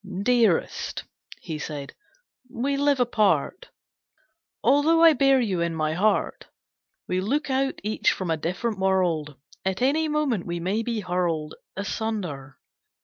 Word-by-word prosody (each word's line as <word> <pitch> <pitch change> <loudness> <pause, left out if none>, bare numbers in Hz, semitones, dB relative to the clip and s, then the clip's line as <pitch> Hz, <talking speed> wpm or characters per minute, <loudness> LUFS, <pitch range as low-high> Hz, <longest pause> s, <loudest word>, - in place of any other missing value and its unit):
"Dearest," 230 -7 +1 0.4
he 155 -1 -5
said, 145 -2 -6 0.6
"we 270 +3 -1
live 285 -1 +2
apart 230 - +1 0.9
Although 315 +4 +4
I 330 -1 +8
bear 275 -1 +4
you 195 -8 0
in 170 -1 -1
my 155 -1 0
heart. 200 +4 0 0.6
We 185 0 0
look 285 +8 -1
out 270 +1 0
each 215 +1 +1
from 185 -3 -3
a - - +2
different 185 +7 -3
world. 175 -6 +1 0.3
At 190 0 -1
any 310 +4 +2
moment 300 - -1
we 170 0 -3
may 190 +6 -1
be 230 -1 -2
hurled 175 -4 -1 0.2
Asunder. 190 - -4
205 Hz, 135 wpm, -25 LUFS, 170-265 Hz, 0.9 s, I